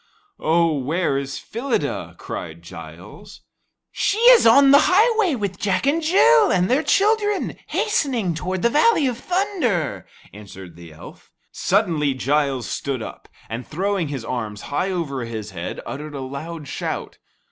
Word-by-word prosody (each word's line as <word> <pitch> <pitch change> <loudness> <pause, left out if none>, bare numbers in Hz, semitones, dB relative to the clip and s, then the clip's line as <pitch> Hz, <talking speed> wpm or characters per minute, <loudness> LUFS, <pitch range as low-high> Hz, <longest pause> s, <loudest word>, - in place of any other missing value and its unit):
"Oh, 165 0 +2
where 150 +3 -1
is 140 0 -5
Phyllida?" 240 +3 -3
cried - - -7
Giles. - - -12 0.5
"She 410 0 0
is 475 - +6
on 275 +4 +7
the 280 +2 +6
highway 430 - +3
with 200 -5 -4
Jack 195 +2 0
and 300 +4 +2
Jill 310 - +5
and 180 +2 +1
their 270 +4 +3
children, 415 +2 +1
hastening 270 - 0
toward 180 +3 -4
the 235 - +3
Valley 320 - +3
of 245 -2 -2
Thunder," 255 - -1 0.3
answered 95 -4 -11
the 85 -1 -13
elf. 75 - -14 0.2
Suddenly 165 -9 0
Giles 135 -1 0
stood 135 -5 -3
up, - - -10 0.2
and 115 +3 -5
throwing 190 +1 -1
his 135 -5 -5
arms 110 -5 -4
high 185 +6 0
over 150 -9 -3
his 110 -3 -6
head, 85 -1 -6
uttered 150 +1 -7
a 135 - -5
loud 145 +4 -7
shout. - - -5
175 Hz, 145 wpm, -21 LUFS, -, 0.5 s, on